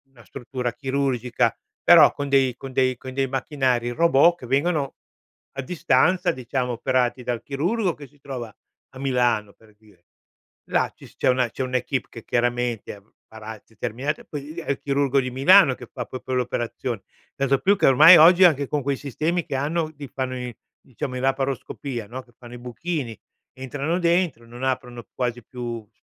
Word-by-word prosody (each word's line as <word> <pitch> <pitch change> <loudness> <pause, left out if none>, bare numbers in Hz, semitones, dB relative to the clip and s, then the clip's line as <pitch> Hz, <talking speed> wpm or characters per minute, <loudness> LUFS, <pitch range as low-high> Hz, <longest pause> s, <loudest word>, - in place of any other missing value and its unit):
Una 125 -4 -19
struttura 125 -2 -5
chirurgica, 130 -3 0 0.3
però - - +8
con 145 - -5
dei 135 -3 +3
con 135 - -8
dei 130 -1 +2
con 130 +1 -9
dei 135 0 0
macchinari 130 -3 0
robot 170 +4 +4
che - - -9
vengono 140 +1 0 0.6
a - - -1
distanza, 170 +4 +2
diciamo, 125 0 -3
operati 125 +1 0
dal 120 -1 -2
chirurgo 175 +8 -1
che 145 -2 -12
si 145 +2 -27
trova 125 -6 -7 0.4
a 130 - -13
Milano, 120 -6 0
per 110 -1 -23
dire. 105 -5 -24 0.6
Là - - 0
ci - - -15
s - - -17
c'è - - -1
una 125 -1 +2
c'è 130 - -4
un'équipe 130 0 -2
che 115 - -11
chiaramente 120 -4 -1 0.3
farà 110 -1 -9
determinati 120 +7 -4
poi 145 - -6
lì 145 +3 -10
lì - - -5
è - - -9
il 140 - -3
chirurgo 140 -1 +1
di 130 -1 -4
Milano 140 +4 +6
che 125 - -11
fa - - -5
proprio 130 0 -6
le 125 - +2
operazioni. 120 -2 -3 0.3
Tanto 140 0 +1
più 195 +9 +3
che - - +3
ormai 155 +7 +9
oggi 175 +4 +7
anche 145 -6 +4
con 150 +1 -1
quei 140 0 -1
sistemi 155 +6 -2
che - - -4
hanno 155 +3 -1
ti 145 -2 -9
fanno 130 -1 -4
i 125 -2 -6 0.3
diciamo, 130 0 -6
in 125 - -3
laparoscopia, 135 -3 -2
no, 125 +4 -7
che 125 - -25
fanno 120 -1 -12
i - - -7
buchini, 125 - -4 0.4
entrano 140 +6 -3
dentro, 170 -8 +1
non 120 +2 -10
aprono 125 -3 -3
quasi 120 -1 -3
più, 120 -2 -6
c - - -44
130 Hz, 185 wpm, -23 LUFS, 120-140 Hz, 0.6 s, ormai